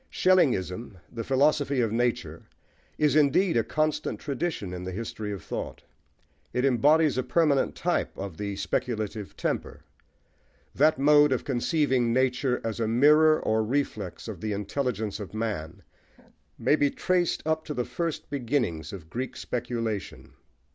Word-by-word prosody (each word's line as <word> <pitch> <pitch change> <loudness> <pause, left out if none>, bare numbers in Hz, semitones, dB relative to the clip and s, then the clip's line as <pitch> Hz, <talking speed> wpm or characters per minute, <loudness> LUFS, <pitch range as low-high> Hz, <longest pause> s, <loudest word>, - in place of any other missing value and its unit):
Schellingism, 120 - +1 0.2
the 115 -1 -4
"Philosophy 140 +1 +2
of 115 -3 +1
Nature," 120 +1 -1 0.5
is 150 -1 +2
indeed 155 +5 +3
a 115 - +3
constant 155 +2 -1
tradition 140 - -3
in 90 0 -6
the 95 - -5
history 110 +1 -5
of 100 -4 -6
thought: - - -6 0.7
it 125 +2 +1
embodies 145 +2 +4
a - - 0
permanent 140 +2 +2
type - - -1
of 95 -3 -6
the 100 +1 -3
speculative 105 0 -3
temper. - - -3 0.9
That 155 +1 +3
mode 145 +1 +5
of 130 - 0
conceiving 130 -2 +1
nature 130 +1 +1
as 115 0 -3
a 115 - 0
mirror 150 +7 +5
or 110 0 +1
reflex 110 -7 -3
of 100 -6 -7
the 110 -1 -2
intelligence 105 0 -2
of 105 0 -8
man 105 -8 -4 0.7
may - - +3
be 145 -2 +2
traced 180 +3 0
up 160 0 0
to 150 - -5
the 125 - -1
first 165 -2 -3
beginnings 120 - -1
of 90 -5 -9
Greek 125 +9 -5
speculation. 115 -4 -4
125 Hz, 145 wpm, -27 LUFS, 110-145 Hz, 0.9 s, mode